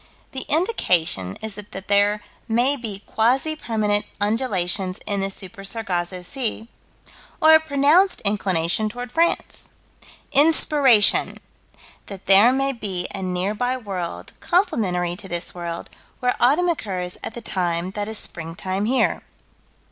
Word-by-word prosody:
The 265 - -4
indication 175 - +1
is 220 -1 -4
that 200 -1 -9
there 205 +1 +3 0.2
may 245 +5 +2
be 215 -6 -7
quasi 260 +8 +1
permanent 210 -6 -1
undulations 195 -4 0
in 200 -2 -1
the 195 - -1
Super 195 +1 -9
Sargasso 185 -4 -2
Sea, 230 +1 -3 0.7
or 315 -1 +7
a 315 - +8
pronounced 315 +5 +3
inclination 200 -1 0
toward 245 +2 -7
France 335 +4 0 0.6
Inspiration: 285 -6 +4 0.7
That 195 -2 -9
there 200 +5 +7
may 270 +1 +1
be 195 -7 -3
a 195 - -5
nearby 205 +7 -1
world 190 -7 -6
complementary 185 - 0
to 195 - -7
this 175 -2 -3
world, 170 -1 -6 0.3
where 250 0 +1
autumn 295 +9 +4
occurs 185 - -3
at - - -4
the 235 - -6
time 175 -2 -1
that 205 0 -4
is 220 0 -2
springtime 185 +4 -4
here. 255 +4 +1
210 Hz, 130 wpm, -22 LUFS, 185-255 Hz, 0.7 s, a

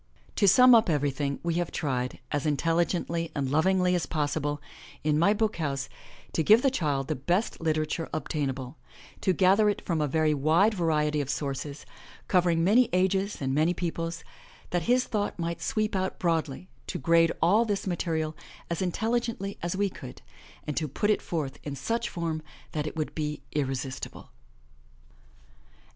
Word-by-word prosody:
To 200 - +4
sum 250 +6 +8
up 225 -4 +5
everything, 140 -2 0
we 170 0 0
have 175 - -4
tried, 125 -4 -2
as 145 0 -1
intelligently 165 +2 0
and 135 -3 -1
lov 155 +4 +3
ingly 185 -1 +3
as 175 -2 0
possible, 145 -1 -1 0.4
in 150 0 +2
My 175 +5 +5
BOOK 215 -1 0
HOUSE, 140 -4 -2 0.4
to - - +1
give 215 - +6
the 270 - +4
child 145 - -1
the 155 - 0
best 175 - -1
literature 155 0 -1
obtainable, 135 -3 -3 0.4
to 190 - +2
gather 195 +3 +4
it 205 - -3
from 165 -3 0
a 150 - +1
very 155 +1 +2
wide 160 +9 +3
variety 150 -5 +1
of 140 - -5
sources, 140 +1 -4 0.4
covering 175 -3 +3
many 225 +7 +4
ages 190 0 +1
and 135 0 0
many 160 +5 +2
peoples, 165 -1 -3 0.5
that 175 - +1
his 250 +1 +4
thought 205 -3 -2
might 170 -1 -3
sweep 215 -2 -1
out 190 0 -1
broadly, 165 -1 -1 0.2
to - - -3
grade 165 +3 +4
all 200 +8 +4
this 205 -3 -2
material 160 -4 -1 0.4
as 170 - -1
intelligently 220 +1 -1
as 175 +2 -2
we 200 0 +2
could, 60 - -10 0.4
and 150 - -3
to 155 - 0
put 205 +10 0
it 210 - +1
forth 150 -6 -4
in 145 -2 -5
such 230 - -2
form 165 -3 -3 0.3
that 150 -1 -2
it - - -6
would 155 -2 -3
be 150 -1 -3
irresistible. 135 -2 -4
165 Hz, 165 wpm, -28 LUFS, 150-190 Hz, 0.5 s, sum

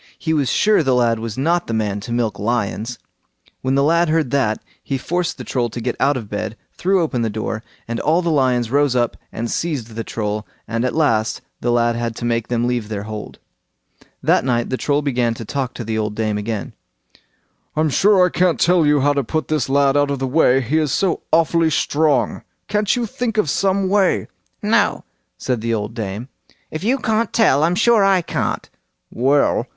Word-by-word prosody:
He 160 -1 -1
was 145 -4 +1
sure 210 -3 +3
the 130 -4 +2
lad 115 -2 +2
was 115 0 -5
not 170 +6 +1
the 115 - -2
man 105 -2 -1
to 115 +4 -8
milk 115 -4 -1
lions. 115 +1 -2 0.6
When 130 +1 0
the 140 - +3
lad 170 +2 +3
heard 155 -5 +1
that, 125 -6 +1 0.2
he 135 - -2
forced 175 +6 -2
the - - -7
Troll 120 -2 -1
to 115 - -6
get 120 +1 -2
out 140 0 +2
of 115 -4 -6
bed, 105 +2 -4 0.2
threw 190 -1 +1
open 130 -7 -1
the 115 - 0
door, 110 +1 -3 0.3
and 115 0 -3
all 165 +4 +2
the 170 - +1
lions 125 -5 +1
rose 140 -2 +2
up 120 -2 +1 0.2
and 115 +1 -4
seized 145 -9 -2
the 115 +1 -4
Troll, 105 -1 -3 0.2
and 115 +1 -1
at 125 - -1
last 115 -9 +1 0.2
the 120 - 0
lad 120 0 +2
had 115 -1 -3
to 120 - -5
make 115 -1 0
them 120 -1 0
leave 120 -3 -1
their 100 -2 -4
hold. 105 0 -7 0.9
That - - +3
night 120 -2 0
the - - +1
Troll 145 +2 0
began 120 -4 0
to 115 - -7
talk 135 +1 -3
to 120 - -5
the 110 0 -2
old 105 -1 -2
dame 110 -1 -1
again. 105 0 -4 1.0
"I'm 155 -1 +1
sure 190 +5 +5
I - - +1
can't 180 -1 +1
tell 175 -1 +4 0.2
how 145 +1 +3
to 140 -1 0
put 155 +6 -3
this 150 -5 0
lad 140 0 +3
out 145 0 +3
of 140 - -1
the 135 - -2
way—he 135 0 +2
is 150 -4 0
so 190 +3 0
awfully 165 0 +3
strong; 150 0 +1 0.3
can't 210 0 +1
you 245 -1 -1
think 225 0 -3
of 170 -10 +2
some 195 +1 +1
way? 195 -1 +2 0.4
"No," - - +2 0.3
said 125 -4 -2
the 115 0 0
old 105 +1 -4
dame, 110 +1 -5 0.4
"if 155 - -5
you 250 +6 +2
can't 220 -3 0
tell, 175 - +3
I'm 170 +2 +2
sure 225 +1 +4
I 195 -2 +3
can't." - - -2 0.4
"Well!" 135 -1 +2
130 Hz, 205 wpm, -20 LUFS, 115-160 Hz, 1.0 s, sure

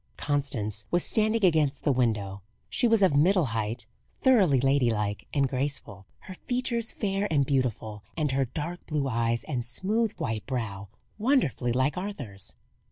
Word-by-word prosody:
Constance 115 -8 -2
was 175 0 +1
standing 220 -1 +2
against 150 -5 +2
the 145 - +3
window. 105 -6 0 0.3
She 245 - +2
was 225 -3 +4
of 180 -7 +4
middle 175 +4 +4
height, 110 +2 -2 0.3
thoroughly 195 - +4
ladylike 120 -6 +1
and 140 -2 +2
graceful; 130 -8 -4
her 185 - -9
features 240 +2 -2
fair 200 -1 -1
and 140 -3 +3
beautiful, 115 -6 -1
and 150 -3 +1
her 135 0 +1
dark 165 +7 -5
blue 150 -3 -1
eyes 115 -1 0
and 130 -5 -3
smooth 210 - 0
white 110 -2 -4
brow 110 -7 -3 0.3
wonderfully 215 - +2
like 130 +6 +1
Arthur's. 135 - -6
140 Hz, 150 wpm, -27 LUFS, 115-185 Hz, 0.3 s, was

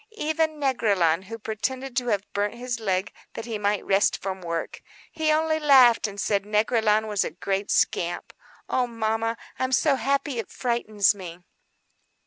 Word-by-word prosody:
Even 315 -2 0
Négrillon, 200 - +1
who 225 +3 -7
pretended 250 +4 -4
to 250 -1 0
have 205 -3 0
burnt 205 +2 -1
his 245 -1 -4
leg 190 -3 -1 0.2
that - - -6
he 225 -3 -4
might 205 0 0
rest 195 +1 +2
from 190 -1 -5
work—he 180 - -4
only 315 0 +1
laughed, 260 -7 +6
and 200 -1 -8
said 200 0 +1
Négrillon 215 +1 +1
was 205 -3 0
a - - -3
great 195 +2 -3
scamp. 175 0 0 0.3
Oh, 250 -1 0
mamma, 225 0 -1 0.2
I'm 260 0 -1
so 270 +3 +3
happy; 275 +1 -1
it 225 - -5
frightens 220 -5 +1
me." 180 -3 -10
220 Hz, 155 wpm, -25 LUFS, 200-255 Hz, 0.3 s, laughed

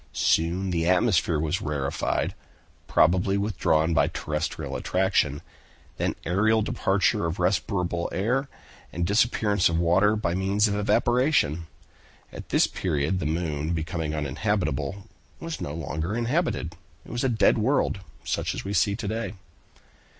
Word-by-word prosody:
Soon 90 +4 +1
the 85 0 +1
atmosphere 90 -4 +2
was 80 +4 -1
rarefied, 75 0 -1 0.5
probably 95 +4 +3
withdrawn 85 -5 +1
by 70 -2 +3
terrestrial 75 0 -3
attraction; 90 -7 0 0.5
then - - -1
aerial 110 +5 +2
departure 95 -5 +1
of 80 - -3
respirable 90 -1 0
air, 125 +8 0 0.4
and 85 +1 -2
disappearance 105 -1 +2
of 85 - 0
water 90 +5 +3
by 85 -6 -1
means 100 +3 +2
of 100 - -1
evaporation. 105 - +2 0.7
At - - -9
this - - +4
period 80 +1 -1
the 80 - -2
moon 80 -1 -2
becoming 80 -1 -3
uninhabitable, 75 +2 -2 0.3
was 165 -1 -6
no 70 - -4
longer 80 +4 -3
inhabited. 120 - -1 0.3
It - - -11
was 120 +2 -2
a 135 - +2
dead 115 -1 +3
world, 120 -3 +1 0.2
such - - -2
as - - -6
we 100 - -3
see 100 0 +2
it - - -4
to 110 - -5
day." 110 +2 -3
90 Hz, 140 wpm, -26 LUFS, 80-105 Hz, 0.7 s, this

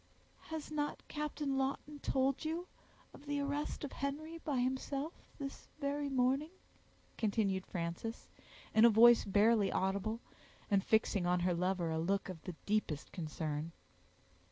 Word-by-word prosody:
"Has 315 -1 -5
not 295 -1 -2
Captain 295 -2 -2
Lawton 280 +2 -2
told 270 0 +1
you 330 +3 -2 0.5
of 290 - -14
the 290 0 0
arrest 285 +2 -2
of 290 - -4
Henry 310 +4 -4
by 290 -4 -2
himself 265 +5 -1 0.2
this 275 -2 -6
very 285 0 -1
morning?" 270 +3 +2 0.7
continued 200 -4 +1
Frances, 170 +6 -4 0.5
in 220 - +6
a 235 - +10
voice 235 +2 +8
barely 205 +1 +4
audible, 200 +4 0 0.5
and 195 -1 +4
fixing 205 -4 +2
on 180 0 +2
her 180 0 +2
lover 180 -1 0
a 160 - 0
look 195 +4 0
of 175 -4 -7
the 180 - -5
deepest 205 -9 -1
concern. 155 -2 -3
235 Hz, 140 wpm, -35 LUFS, 190-285 Hz, 0.7 s, a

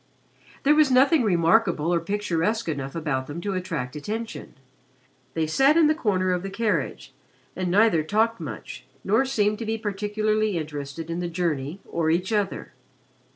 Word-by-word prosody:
There 290 - +5
was 305 -2 +4
nothing 270 +4 +5
remarkable 175 -3 +2
or 170 - +3
picturesque 205 +3 -1
enough 140 -3 -4
about 140 -5 -2
them 150 +3 -6
to 200 +2 -2
attract 165 -9 -4
attention. 220 +9 -5 0.8
They 160 -1 +1
sat 270 - +4
in 330 - +6
the 305 - +4
corner 190 - 0
of 180 - -1
the 195 - -5
carriage 190 - -2 0.4
and 185 0 -2
neither 200 -3 +4
talked 220 +7 +1
much - - -7 0.2
nor 270 - +2
seemed 210 -5 +1
to 230 - -4
be 225 0 -1
particularly 215 -1 -1
interested 150 +1 -5
in 170 - -2
the 175 - -2
journey 165 -1 -2
or 165 -1 -1
each 180 +6 0
other. 205 -2 -2
190 Hz, 160 wpm, -25 LUFS, 165-220 Hz, 0.8 s, in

